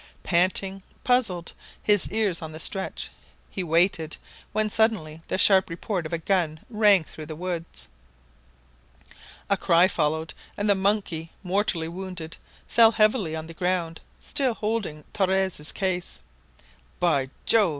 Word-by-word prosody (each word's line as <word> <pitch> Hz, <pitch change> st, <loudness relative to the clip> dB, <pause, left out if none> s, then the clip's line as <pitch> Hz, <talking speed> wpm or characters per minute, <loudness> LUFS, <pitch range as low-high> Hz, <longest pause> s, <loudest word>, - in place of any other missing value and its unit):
Panting, 190 Hz, +2 st, +2 dB, 0.2 s
puzzled, 215 Hz, -9 st, +1 dB, 0.3 s
his 205 Hz, -2 st, +4 dB
ears 210 Hz, -5 st, 0 dB
on 160 Hz, -1 st, -7 dB
the 155 Hz, -, -8 dB
stretch, 190 Hz, +3 st, -3 dB, 0.4 s
he 190 Hz, -, -3 dB
waited, 165 Hz, -1 st, +1 dB, 0.3 s
when 215 Hz, +1 st, +1 dB
suddenly 205 Hz, -8 st, 0 dB
the -, -, -1 dB
sharp 190 Hz, -1 st, +5 dB
report 170 Hz, 0 st, -3 dB
of -, -, -15 dB
a -, -, +1 dB
gun 165 Hz, -2 st, 0 dB
rang 210 Hz, -5 st, +5 dB
through 155 Hz, -1 st, -10 dB
the 155 Hz, -, -6 dB
woods. 165 Hz, -, -5 dB, 1.6 s
A 200 Hz, -, +3 dB
cry 175 Hz, 0 st, +4 dB
followed, 160 Hz, -2 st, -1 dB, 0.2 s
and 205 Hz, -, -1 dB
the 205 Hz, -, +6 dB
monkey, 190 Hz, -5 st, -1 dB
mortally 185 Hz, -3 st, 0 dB
wounded, 180 Hz, -2 st, -7 dB, 0.3 s
fell 230 Hz, 0 st, +7 dB
heavily 215 Hz, -7 st, +2 dB
on 160 Hz, 0 st, -5 dB
the 165 Hz, -, -10 dB
ground, 175 Hz, -2 st, -2 dB, 0.2 s
still 260 Hz, -5 st, 0 dB
holding 210 Hz, -9 st, -3 dB
Torres' 190 Hz, -5 st, 0 dB
case. 185 Hz, -2 st, -1 dB, 0.8 s
"By 145 Hz, -7 st, +1 dB, 0.2 s
Jove!" 215 Hz, -5 st, +5 dB
185 Hz, 135 wpm, -25 LUFS, 165-205 Hz, 1.6 s, fell